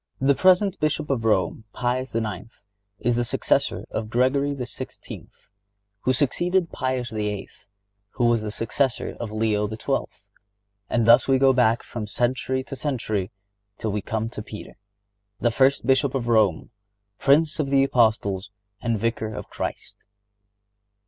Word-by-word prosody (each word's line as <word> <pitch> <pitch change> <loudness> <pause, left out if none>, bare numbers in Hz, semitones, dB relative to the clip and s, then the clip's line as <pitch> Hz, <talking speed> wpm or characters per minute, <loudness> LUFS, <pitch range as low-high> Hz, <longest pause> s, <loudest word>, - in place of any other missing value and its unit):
The 135 +2 +4
present 185 +4 +3
Bishop 155 -1 0
of 115 -4 -1
Rome, 110 +1 +1
Pius 125 0 -2
IX., 110 -2 -4 0.3
is 120 +3 0
the 120 - +1
successor - - 0
of 110 -1 -3
Gregory 140 +4 +1
XVI., 125 -3 -8 0.7
who 130 - +1
succeeded 175 +7 +1
Pius 130 -2 -2
VIII., 105 -2 -3 0.7
who 120 - 0
was 120 -1 +3
the 105 - -4
successor 115 +4 -1
of 115 -3 -4
Leo 105 -1 0
XII. 110 0 -1 0.8
And 115 -2 +1
thus 115 +1 +6
we 135 -1 +4
go 135 0 +5
back 120 -2 +3
from 110 -3 -6
century 130 +3 -1
to 135 - -7
century 110 -9 -2 0.5
till 110 - -2
we 105 +1 -2
come 110 +3 -2
to 105 - -6
Peter, 105 0 -9 0.6
the 120 - +2
first 135 +1 +3
Bishop 135 +1 +2
of 120 -3 -2
Rome, 110 -7 +2 0.5
Prince 150 +3 +3
of 145 -3 0
the 135 0 +4
Apostles 110 -6 +1 0.3
and 115 -2 0
Vicar 110 0 -1
of - - -8
Christ. - - -5
120 Hz, 145 wpm, -24 LUFS, 110-135 Hz, 0.8 s, thus